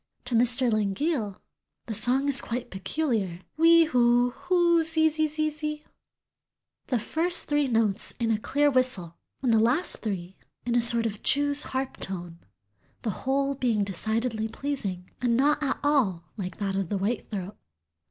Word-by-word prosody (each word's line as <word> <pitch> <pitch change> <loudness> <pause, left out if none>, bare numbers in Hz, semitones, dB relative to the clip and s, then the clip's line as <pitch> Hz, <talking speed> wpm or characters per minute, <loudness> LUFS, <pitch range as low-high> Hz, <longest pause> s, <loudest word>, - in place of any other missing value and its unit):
To 245 - -4
Mr. 245 +1 +3
Langille 215 - -1 0.5
"the 225 - -5
song 250 +6 +2
is 280 -1 +5
quite 240 +1 -5
peculiar, 195 - -2
whee 330 +1 +6
who 245 -4 +3
who 345 +2 +2
zee 320 0 +3
zee 310 0 0
zee, 305 0 -3 1.0
the 250 - +1
first 335 +9 0
three 295 -1 +1
notes 225 -3 0
in 230 -1 +1
a 215 - +1
clear 290 +5 +1
whistle 250 -11 0 0.2
and 245 -3 +3
the 225 - +5
last 250 +11 +1
three 190 -4 -5 0.3
in 240 - -1
a 240 - +3
sort 235 0 +5
of 210 -2 -4
jew's 285 +1 +2
harp 265 0 -3
tone, 175 -3 -5 0.6
the 220 - -1
whole 275 +6 -1
being 240 -6 0
decidedly 220 +4 -1
pleasing, 215 -9 -4
and 235 -2 +2
not 290 +3 +2
at 275 -2 -1
all 195 - +1
like 185 -4 -6
that 195 -2 -2
of 195 -3 -2
the 205 - -1
white 205 +4 -2
throat." 195 -2 -5
240 Hz, 160 wpm, -26 LUFS, 205-290 Hz, 1.0 s, whee